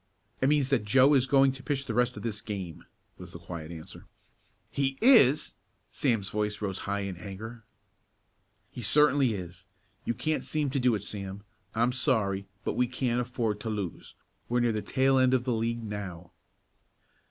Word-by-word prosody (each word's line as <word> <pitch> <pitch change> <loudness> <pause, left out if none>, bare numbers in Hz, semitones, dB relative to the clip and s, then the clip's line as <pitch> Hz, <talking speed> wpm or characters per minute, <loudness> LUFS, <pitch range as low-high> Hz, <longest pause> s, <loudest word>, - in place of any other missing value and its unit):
"It 135 - +3
means 145 -2 +2
that 135 -5 +2
Joe 130 +7 +5
is 135 -2 +3
going 135 -1 +5
to 130 0 -10
pitch 140 -1 -2
the 115 - -3
rest 125 +1 +1
of - - -7
this 110 -3 -3
game," 95 -6 -6 0.3
was 90 -1 -10
the - - -7
quiet 85 -2 -8
answer. 85 +2 -10 0.6
"He 135 -1 -1
is?" 220 - +5 0.4
Sam's 115 -7 0
voice 105 0 -2
rose 95 -3 -3
high 100 0 0
in 95 -3 -4
anger. 110 +5 -8 1.1
"He 125 - -7
certainly 140 -3 +4
is. 90 -2 -8 0.4
You 120 - -2
can't 155 +7 -1
seem 150 -3 -1
to 140 - 0
do 125 -2 +3
it, 100 - -4
Sam. 100 -1 -7 0.3
I'm 120 +2 +2
sorry, 105 -7 0 0.2
but - - -1
we 125 0 +1
can't 125 -1 0
afford 120 -4 -2
to 110 - -4
lose. 100 -5 -5 0.3
We're 120 +1 +2
near 120 -1 +2
the 110 -1 -2
tail 130 +6 +2
end 130 0 +4
of 125 - 0
the 125 -1 0
league 115 +1 -1
now." 95 -5 -6
115 Hz, 180 wpm, -29 LUFS, 100-130 Hz, 1.1 s, Joe